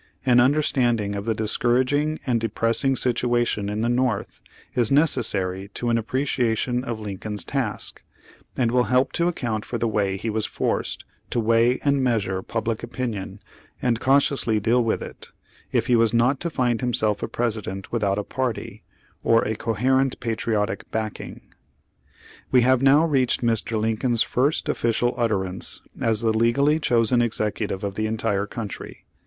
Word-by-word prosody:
An 125 -2 +5
understanding 120 -6 +2
of 100 0 -4
the 115 -1 0
dis 110 0 -2
couraging 140 +5 +2
and 120 -4 +1
depressing 115 +4 +1
situation 120 -4 0
in 105 +1 -2
the 115 - +1
North, 120 -3 -1 0.3
is 120 -2 +1
necessary 105 - +1
to 120 - -2
an 115 - +3
appreciation 125 0 0
of 115 -3 -4
Lincoln's 105 -1 -5
task, - - -3 0.6
and 120 -3 +2
will 125 0 +3
help 130 +1 +2
to 170 - +1
account 120 -11 -2
for 120 - -4
the 115 - 0
way 100 -3 0
he 115 - -5
was 110 0 0
forced - - -2 0.2
to - - -1
weigh 115 +2 +3
and 140 -2 +2
measure 100 -7 0
public 115 +2 -3
opinion, 110 -5 -5 0.4
and 120 -2 0
cau 135 +2 +4
tiously 130 -6 +1
deal 120 +4 +2
with 115 - -1
it, - - -10 0.4
if - - +1
he 125 - +3
was 115 0 +3
not 125 +4 +3
to 170 - -2
find 125 -6 0
himself 110 -4 0
a - - -2
President 105 -5 -3
without 100 -4 0
a 105 - -1
party, 130 +1 -4 0.4
or 115 0 +4
a 110 - -1
coherent 130 +5 +1
patri 115 -1 -2
otic 105 +1 -1
backing. 110 -2 -5 1.1
We 125 - +5
have 130 0 +3
now 140 +4 +5
reached 135 -6 +1
Mr. 115 -1 0
Lincoln's 115 +2 +1
first 140 +5 0
official 120 -3 +1
utterance 95 -5 -2 0.2
as 110 -2 +1
the 110 -1 +2
legally 140 +7 +3
chosen 120 -4 +2
executive 105 -3 -2
of 100 -1 -2
the 110 +2 -1
entire 105 -2 -1
country. 110 -4 -7
115 Hz, 160 wpm, -23 LUFS, 110-125 Hz, 1.1 s, An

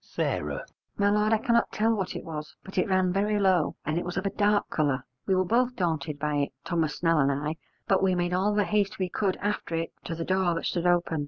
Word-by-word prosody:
S. - - +1 0.6
My 205 0 +3
lord, 210 +1 +2
I 225 - +5
cannot 235 +2 +2
tell 225 +2 +2
what 195 -4 -2
it - - -5
was, 155 -2 -7
but 190 -1 -3
it 185 - +1
ran 185 -1 +2
very 210 +2 +1
low, 190 -3 +2
and 155 +3 0
it - - -4
was 175 +1 -5
of 190 - -1
a 195 - 0
dark 205 0 +2
colour. 140 -4 0 0.2
We 190 - +3
were 185 0 +2
both 245 +5 +2
daunted 155 -5 -1
by 150 0 -1
it, 140 -1 -1
Thomas 165 -4 0
Snell 165 -2 +2
and 140 -1 +3
I, 150 +3 -2 0.3
but 195 - +3
we 190 -1 +3
made 175 0 0
all 200 +3 +1
the 210 - +3
haste 205 -2 0
we 185 -1 -1
could 190 0 0
after 205 -4 -2
it 165 0 -3
to 165 - -3
the 165 0 -4
door 185 -2 +1
that - - -3
stood 175 0 0
open. 175 -2 +2
185 Hz, 250 wpm, -27 LUFS, 165-205 Hz, 0.6 s, I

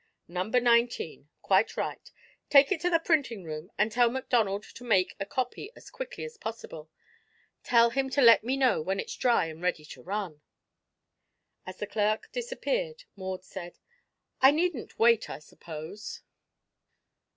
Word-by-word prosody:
"Number 185 +8 0
nineteen. 240 - +1
Quite - - +2
right. - - -4 0.4
Take 280 +2 +6
it 390 - 0
to 355 - +1
the 335 - +4
printing 285 - 0
room 155 0 -7
and 215 +1 +2
tell 240 +1 +4
McDonald 230 -5 0
to 245 - -13
make 200 -6 +3
me - - -13
a 195 - -3
copy 255 - -3
as - - -14
quickly - - -7
as 470 -1 -8
possible. 195 - -7 0.7
Tell 235 -1 +4
him 270 +1 0
to 280 +2 +1
let 230 -2 +8
me 260 +4 -1
know 260 -11 +3
when 190 +5 -2
it's - - -5
dry 240 -8 +2
and 160 0 -8
ready 180 -4 -1
to - - -11
run." 185 -5 -4 1.3
As 185 0 -7
the - - -3
clerk 210 +1 -1
disappeared - - -3
Maud 190 -1 -5
said: 175 -2 -9 0.6
"I 265 - +9
needn't 315 -2 -1
wait, 230 -1 +4
I - - -5
suppose?" 155 +5 -9
230 Hz, 160 wpm, -28 LUFS, 190-270 Hz, 1.3 s, I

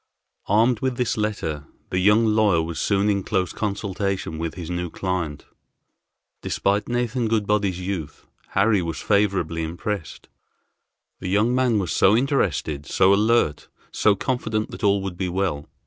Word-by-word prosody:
Armed 110 +3 +3
with 130 -2 -1
this 125 -2 0
letter 90 -9 -3 0.2
the 90 - +1
young 105 +4 +4
lawyer 105 -5 +3
was 80 0 -5
soon 100 0 +1
in 100 -1 +1
close 95 -2 -1
consultation 100 -5 -3
with 80 -1 -3
his 85 -3 -6
new 90 0 -3
client. 85 -5 -3 1.0
Despite 100 +1 0
Nathan 120 0 0
Goodbody's 105 -4 0
youth 90 -6 -5 0.3
Harry 100 0 +3
was 85 -2 -4
favorably 95 -6 +1
impressed. 85 +2 -5 0.9
The 90 - -4
young 105 +5 +2
man 125 -3 +2
was 95 -5 -1
so 105 +4 +5
interested, 90 - 0
so 95 +1 +4
alert, 105 -7 +2 0.2
so 105 -2 +3
confident 110 -2 -2
that - - -9
all 100 -1 +3
would 95 -2 -5
be 90 -1 -2
well. 90 -6 -2
100 Hz, 145 wpm, -23 LUFS, 90-110 Hz, 1.0 s, so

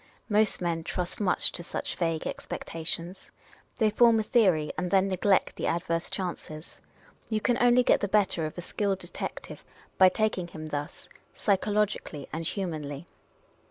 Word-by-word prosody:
Most 210 -1 +2
men 170 -2 -1
trust 180 +1 -4
much 195 -4 +3
to - - -3
just 170 - -13
such - - -3
vague 165 -2 -1
expecta 165 -1 -6
tions. 175 +3 -4 0.5
They 220 -3 +2
form 230 +1 +5
a - - 0
theorj', 185 - +3
and 180 - -2
then 195 +1 +3
neglect 190 +1 +1
the - - -2
adverse 170 0 -1
chances. 170 -4 -6 0.5
You 220 -1 0
can 240 +3 +1
only 245 +1 +5
get - - +4
the 205 - 0
better 190 -5 +2
of 155 - -10
a - - -3
skilled 195 +2 -1
detective - - -7 0.4
by 185 -1 +8
taking 195 -3 0
him 155 -2 -8
thus, 150 +2 -5 0.3
psychologically 205 -7 0
and 160 +1 -1
humanly. 155 -6 -4
185 Hz, 160 wpm, -28 LUFS, 165-210 Hz, 0.5 s, by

